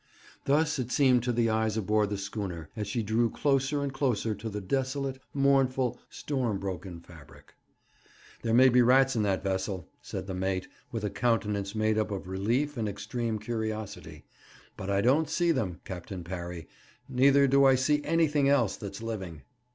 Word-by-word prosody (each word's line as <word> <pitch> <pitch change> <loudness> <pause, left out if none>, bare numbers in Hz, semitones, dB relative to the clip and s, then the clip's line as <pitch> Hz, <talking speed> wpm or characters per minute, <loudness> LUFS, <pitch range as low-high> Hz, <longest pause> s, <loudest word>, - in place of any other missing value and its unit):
Thus 150 +1 +2
it 125 -1 -3
seemed 130 -2 +4
to 125 - +1
the 115 -1 +1
eyes 110 0 0
aboard 105 0 +1
the 105 - -2
schooner 95 -5 -5
as 105 -3 -3
she 115 +3 -1
drew 115 +3 +1
closer 140 +2 +1
and 140 -1 -3
closer 125 -5 0
to 105 +2 -6
the 105 0 -4
desolate, 135 +5 -2
mournful, 135 -2 +2
storm 125 -8 -2
broken 95 -2 -5
fabric. 80 -5 -16 0.9
'There 115 -1 +1
may 130 +2 +7
be 125 0 +5
rats 130 +2 +4
in 110 - +1
that 95 -2 0
vessel,' 95 -1 -2
said - - -6
the 95 - -5
mate, 95 0 -2 0.2
with 115 -2 -4
a 105 - -1
countenance 105 -2 0
made 110 0 +1
up 110 - 0
of 100 -2 -5
relief 120 +10 -1
and 110 -2 -1
extreme 110 +3 -3
curiosity; 110 -1 -5 0.5
'but 95 - -6
I 100 0 +2
don't 140 +6 +3
see 170 +1 +2
them, 95 - -2
Captain 90 0 -7
Parry, 85 -2 -6 0.4
neither 140 +2 +4
do 140 +1 +4
I 135 -1 +6
see 145 +3 +1
anything 150 -3 +2
else 125 -8 +2
that's 100 +1 -7
living.' 95 -10 -5
110 Hz, 175 wpm, -29 LUFS, 100-135 Hz, 0.9 s, may